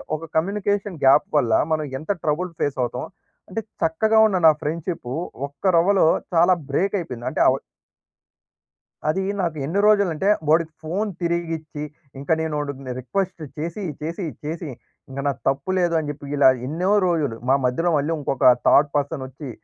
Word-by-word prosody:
ఒక 155 - -7
communication 200 +2 0
gap 135 +2 +6
వల్ల, 120 -6 +2 0.2
మనం 155 -1 -1
ఎంత 160 - -3
ట్రబుల్ 165 +4 -1
ఫేసవుతాం, 130 -4 -1 0.4
అంటే 225 - -3 0.2
చక్కగా 215 +8 +3
ఉన్న 195 -3 0
నా - - +9
ఫ్రెండ్‌షిప్పు, 155 -4 -3 0.3
ఒక్క 145 +7 -5
రవ్వలో 185 +2 +4 0.3
చాలా 175 +2 +5 0.2
బ్రేకయిపోయింది. 170 - -1
అంటే - - -1
అవ - - +3 1.5
అదీ 190 +5 0 0.2
నాకు 165 -4 -2
ఎన్ని 170 +8 -1
రోజులంటే, 200 -3 +3 0.2
ఓడికి 160 0 +2
ఫోన్ 190 +7 -2
తిరిగిచ్చి, 165 -3 -3 0.4
ఇంక 140 - -10
నేనొడిని 145 -4 -3
రిక్వెస్ట్ 180 - -3 0.2
చేసి, 170 +6 -4 0.2
చేసి, 170 +4 -4 0.2
చేసి, 160 +1 -4 0.4
ఇంగ 135 +1 -6
నా 140 - +2
తప్పు 135 +6 0
లేదు 175 -1 +1
అని 150 -2 -4
జెప్పి 145 -1 -7
ఇలా 140 -2 +7 0.2
ఎన్నో 175 +7 0 0.2
రోజులు, 150 -9 0
మా 135 - +6
మధ్యలో 165 +8 +1
మళ్ళీ 145 +3 0
ఇంకొక 135 -3 +4 0.2
థర్డ్ 145 +1 +5
పర్సనొచ్చి, 140 -1 -4
160 Hz, 145 wpm, -22 LUFS, 145-180 Hz, 1.5 s, నా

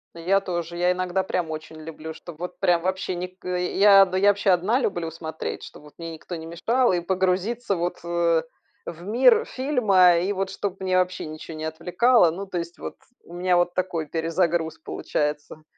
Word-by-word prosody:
Я 185 +4 +1
тоже. 175 -2 -4
Я 180 +1 +2
иногда 185 +1 -1
прям 175 -4 -2
очень 155 0 -7
люблю, 160 0 -8
чтобы 165 0 -12
вот 180 0 -6
прям 175 -1 +3
вообще 185 +1 -2
ник 180 +1 -7
э, 180 0 -2
я, 195 0 +8
да 185 0 -3
я 200 +2 +5
вообще 200 0 +1
одна 190 +8 +3
люблю 175 -9 -2
смотреть, 160 -1 -6
чтоб - - -12
вот 150 - -16
мне 165 -1 -6
никто 165 +2 -8
не 160 -1 -7
мешал, 230 +10 +1
и 180 - +1
погрузиться 190 +5 0
вот, 175 +1 -2
э, 170 -1 +1 0.4
в 170 +1 -8
мир 265 - +4
фильма, 215 - +3
и 185 +4 0
вот 195 0 -2
чтобы 195 0 -4
меня 185 -1 +2
вообще 185 0 -1
ничего 155 +1 -8
не 155 - -6
отвлекало. 175 +6 +3
Ну, 190 +5 -6
то 190 -2 -5
есть, 170 0 -5
вот - - -7 0.3
у 170 - -14
меня 180 0 +1
вот 175 0 +2
такой 180 -3 -2
перезагруз 165 +1 -1
получается. 150 0 -3
180 Hz, 195 wpm, -24 LUFS, 165-190 Hz, 0.4 s, я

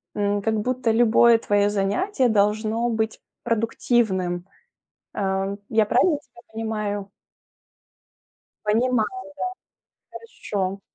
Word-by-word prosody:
М, 205 0 0
как 220 +1 0
будто 250 +2 -1
любое 235 0 +5
твоё 205 -2 +2
занятие 240 - +1
должно 215 +2 +1
быть 220 -1 -2 0.2
продуктивным. 210 -6 0 0.7
Э, 195 0 -1
я 220 -1 +3
правильно 305 - +3
тебя 245 -4 -19
понимаю? 210 -3 -3 1.6
Понимаю, 225 +2 +2
да. 380 0 -8 1.3
Хорошо. 195 -1 -1
220 Hz, 95 wpm, -23 LUFS, 205-235 Hz, 1.6 s, любое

